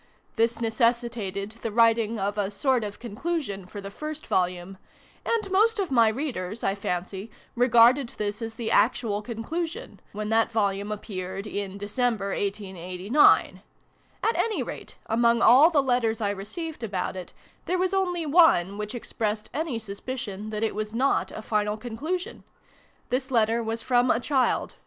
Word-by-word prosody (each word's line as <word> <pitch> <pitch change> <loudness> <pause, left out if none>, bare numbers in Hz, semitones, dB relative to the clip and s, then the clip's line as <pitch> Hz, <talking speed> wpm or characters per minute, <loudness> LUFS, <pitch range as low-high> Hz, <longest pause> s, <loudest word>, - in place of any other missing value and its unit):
This 230 +1 +1
necessitated 230 -3 0
the 225 - -3
writing 230 0 +3
of 200 0 -1
a 205 -2 -1
sort 250 +3 +1
of 205 -1 -5
conclusion 235 - -4
for 205 - -8
the 195 0 -7
first 305 +6 -6
Volume: 180 +1 -1 0.4
and 430 -4 -1
most 435 +4 +3
of 385 -6 -2
my 230 -3 +5
Readers, 220 -5 -3
I 195 - +2
fancy, 190 +1 -4 0.3
regarded 245 +1 +5
this 210 +1 -3
as 225 0 -5
the 225 -1 -3
actual 220 -4 +2
PREFACE. 215 - -16
xiii 235 - -3
conclusion, 330 - -5
when 210 +1 -4
that 225 +1 +2
Volume 205 -2 0
appeared 195 -2 -5
in 200 -2 -4
December, 205 0 -1
1889. 195 - +2 0.6
At 450 - +2
any 445 -2 0
rate, - - -8
among 235 +1 +2
all 280 +7 +8
the 295 -5 +2
letters 245 -4 +1
I 205 -2 0
received 235 - -6
about 195 -6 -3
it, 185 -1 -7 0.4
there 365 - +1
was 370 +1 0
only 355 -3 0
one 280 - +4
which 210 +2 -4
expressed 215 -2 -3
any 300 -3 -2
sus 200 -3 -7
picion 215 -5 -5
that 215 0 -3
it 225 - 0
was 215 +1 -4
not 260 +4 +1
a 215 - -7
final 210 -1 0
conclusion. 285 +11 -4 0.7
This 260 +2 -1
letter 230 -2 +2
was 225 0 -3
from 245 0 +3
a 230 - +3
child. 260 0 0
225 Hz, 165 wpm, -26 LUFS, 205-255 Hz, 0.7 s, all